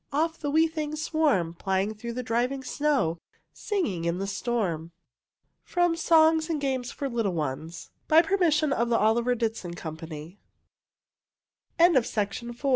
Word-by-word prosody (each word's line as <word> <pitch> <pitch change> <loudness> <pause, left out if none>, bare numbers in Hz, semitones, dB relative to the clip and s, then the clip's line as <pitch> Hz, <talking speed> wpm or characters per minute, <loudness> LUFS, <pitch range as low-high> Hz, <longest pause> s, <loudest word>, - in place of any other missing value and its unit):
Off 320 +3 0
the 290 - -3
wee 320 +3 +4
things 310 -2 -4
swarm, 295 - +1
Plying 190 +3 -1
through 235 +2 -6
the 250 +1 -4
driving 245 +4 -1
snow, 265 - 0 0.3
Singing 230 - -2
in 170 +1 0
the 195 - -2
storm. 195 -6 -2 0.7
From 350 -1 +1
"Songs 320 -1 +4
and 320 -2 -1
Games 260 -3 -2
for 280 - -4
Little 230 -7 -1
Ones," 155 +2 -4 0.2
by 320 +2 +6
permission 320 -5 +2
of 235 -1 0
Oliver 235 +2 +2
Ditson 225 -7 -3
Company, 160 +2 -8 1.4
owners 340 -2 +6
of 235 - 0
the 215 - +3 0.2
copyrig 240 0 -9
240 Hz, 145 wpm, -27 LUFS, 190-310 Hz, 1.4 s, by